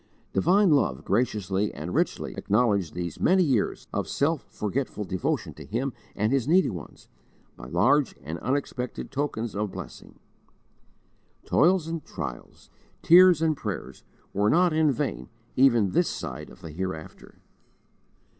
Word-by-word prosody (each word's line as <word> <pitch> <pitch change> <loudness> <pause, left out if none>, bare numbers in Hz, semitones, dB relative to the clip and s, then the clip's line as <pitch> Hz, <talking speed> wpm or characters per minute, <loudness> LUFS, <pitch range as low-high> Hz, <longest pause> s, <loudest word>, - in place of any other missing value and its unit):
Divine 185 - +4
love 75 - +1
graciously 105 -3 0
and 80 +5 -6
richly - - -1
acknowledged 100 -6 +1
these 85 -2 -4
many 185 +1 +4
years 130 - 0
of - - -1
self 155 +1 0
forgetful 105 +1 -3
devotion 95 -2 -2
to - - -11
Him 125 +4 -3 0.2
and 105 +3 0
His 135 -2 +1
needy 180 -3 +4
ones, 85 -7 -10 0.5
by 60 - -10
large 145 - +2
and 80 +4 -5
unexpected 130 -2 -3
tokens 135 -6 -3
of 105 -1 -2
blessing. - - -10 1.3
Toils 175 +1 +3
and 165 -2 -4
trials, - - -8 0.3
tears 175 -1 +7
and 160 -1 +2
prayers, 90 - -6 0.3
were 100 +2 +2
not 175 +3 +4
in 155 -1 +3
vain 130 - -3 0.3
even 120 -7 +4
this - - +2
side - - -6
of - - -16
the 80 - -8
Hereafter. 85 -1 -6
120 Hz, 135 wpm, -26 LUFS, 95-150 Hz, 1.3 s, tears